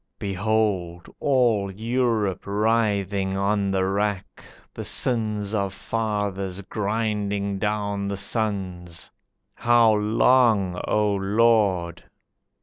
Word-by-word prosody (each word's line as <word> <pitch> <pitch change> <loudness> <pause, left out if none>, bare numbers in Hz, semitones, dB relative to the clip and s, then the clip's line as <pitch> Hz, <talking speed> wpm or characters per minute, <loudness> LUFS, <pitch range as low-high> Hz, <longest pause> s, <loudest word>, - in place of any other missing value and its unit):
Behold 100 -3 -1
all 120 -8 +2
Europe 110 -3 -1
writhing 100 -2 0
on 100 0 0
the 95 -1 +1
rack, 100 0 -2 0.3
The - - -6
sins 110 -4 -1
of 100 -2 -1
fathers 100 -4 -3
grinding 105 -1 -2
down 100 -1 -2
the 100 0 -3
sons! 95 -5 -4 0.4
How 120 -2 +4
long, 105 -3 +3
O 105 -1 +2
Lord?" 100 -4 +1
100 Hz, 90 wpm, -24 LUFS, 95-110 Hz, 0.4 s, How